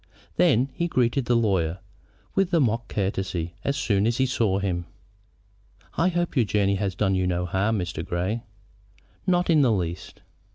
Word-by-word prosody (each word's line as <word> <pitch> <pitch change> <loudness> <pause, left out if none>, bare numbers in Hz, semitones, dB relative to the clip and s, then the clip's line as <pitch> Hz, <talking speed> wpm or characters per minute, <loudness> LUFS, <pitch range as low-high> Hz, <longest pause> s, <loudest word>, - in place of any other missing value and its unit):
Then 130 +5 +3
he 170 +5 -1
greeted 130 -3 +1
the 120 - +2
lawyer 95 -7 +1 0.6
with 195 -2 +1
a - - +4
mock 120 -3 +1
courtesy 95 -4 -2
as 140 0 -1
soon 105 -6 +1
as 115 - 0
he 130 - +3
saw 115 -6 +1
him. 90 -3 -2 1.1
"I 165 - +2
hope 175 -2 -1
your 125 -5 +3
journey 100 -1 +1
has 95 -2 -2
done 95 0 +1
you 95 -1 +1
no 90 0 0
harm, 100 +5 0
Mr. 90 -3 -3
Grey." 90 +8 -2 0.9
"Not 180 -1 +2
in 155 -2 +5
the 130 -4 +4
least." 90 -4 -3
105 Hz, 170 wpm, -25 LUFS, 95-130 Hz, 1.1 s, in